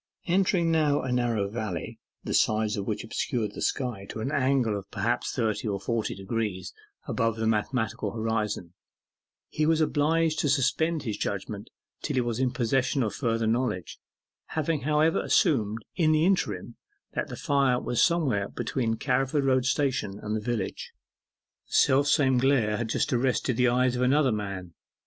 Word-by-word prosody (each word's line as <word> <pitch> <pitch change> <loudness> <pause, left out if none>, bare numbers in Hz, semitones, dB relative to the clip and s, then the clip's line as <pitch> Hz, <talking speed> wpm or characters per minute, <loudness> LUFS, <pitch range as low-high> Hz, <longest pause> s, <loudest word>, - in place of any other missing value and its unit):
Entering 180 -2 +2
now 150 -3 +2
a 130 - -2
narrow 120 -5 +1
valley, 105 -4 -5 0.2
the - - -3
sides 110 0 +2
of 100 -1 -4
which 105 - -2
obscured 115 -1 -2
the - - -7
sky 120 -8 -2
to - - -6
an 125 +6 -2
angle 130 -6 +2
of 100 -1 -7
perhaps 115 +4 -1
thirty 110 -3 -1
or 100 -2 -1
forty 110 +3 -2
degrees 100 -1 -3 0.3
above 115 -2 0
the 110 0 -2
mathematical 110 0 0
horizon, 105 -5 -2 0.7
he 155 0 -1
was 160 0 +3
obliged 155 +1 +2
to 145 - +1
suspend 145 +4 +1
his 110 -5 -3
judgment 100 +1 -4 0.3
till - - -3
he 130 - +3
was 120 -1 -2
in 130 -1 +2
possession 130 +2 0
of 110 - -2
further 115 -4 -1
knowledge, 110 - -1 0.6
having 155 -1 0
however 155 +3 +2
assumed 110 -5 +1
in 155 -3 +3
the 155 +1 +3
interim, 120 - 0 0.4
that - - -2
the - - -7
fire 135 -3 +2
was 120 - 0
somewhere 135 - +2
between 115 -4 -2
Carriford 135 +3 0
Road 130 -2 +2
Station 135 -8 0
and 105 +1 -4
the 110 - -2
village. 115 -3 -3 0.7
The - - -13
self 140 +1 +4
same 135 -4 +3
glare 125 -6 +2
had 120 -2 -3
just 145 - 0
arrested 125 0 +1
the 125 +2 +3
eyes 125 +1 +2
of 125 - -2
another 135 +1 +3
man. 100 -5 -4
120 Hz, 170 wpm, -27 LUFS, 110-140 Hz, 0.7 s, self